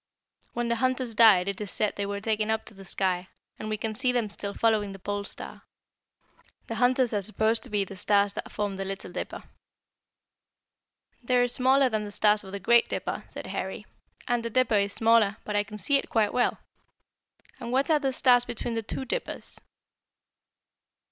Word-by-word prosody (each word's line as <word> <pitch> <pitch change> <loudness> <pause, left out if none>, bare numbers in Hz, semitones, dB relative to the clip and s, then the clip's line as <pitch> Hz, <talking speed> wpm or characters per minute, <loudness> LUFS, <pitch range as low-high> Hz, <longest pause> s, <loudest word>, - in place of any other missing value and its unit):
"When 240 0 -2
the 235 0 0
hunters 255 -1 0
died 210 -5 +6
it 200 +1 -3
is 205 - -4
said 210 +3 -1
they 200 0 -3
were 200 0 -3
taken 215 0 -1
up 220 0 0
to - - -7
the 195 -1 -12
sky, 185 -1 -1 0.3
and 215 - -5
we 215 - -1
can 220 +1 -3
see 255 +3 +1
them 235 -4 -1
still 200 0 -5
following 215 -3 +1
the - - -9
Pole 205 +1 -4
Star. - - -7 1.0
The - - -5
hunters 250 -1 +3
are 205 - 0
supposed 220 +3 +3
to - - -5
be 205 -1 +1
the 195 - -10
stars 200 +1 +2
that - - -6
form 205 -2 -3
the 195 - -3
Little 195 -1 -5
Dipper." - - -6 1.8
"They 250 +1 +1
are 245 0 +4
smaller 260 +2 +3
than 215 -3 -1
the 205 - -6
stars 210 +1 +3
of 190 - -10
the 200 - -5
Great 235 +5 +4
Dipper," - - -3
said - - -8
Harry, - - -5 0.4
"and 240 -1 0
the 230 - -3
dipper 255 0 +2
is 200 -1 +2
smaller, 225 -2 +3
but 210 - -3
I 205 - +2
can 210 0 -10
see 280 +7 +3
it - - -5
quite 215 -3 +1
well. 245 - +1 1.0
And 235 - -6
what 270 +4 +1
are 305 - +4
the 270 -2 0
stars 250 -1 +4
between 240 0 -5
the 225 - -1
two 245 +4 -5
Dippers?" - - -4
220 Hz, 200 wpm, -27 LUFS, 200-245 Hz, 1.8 s, died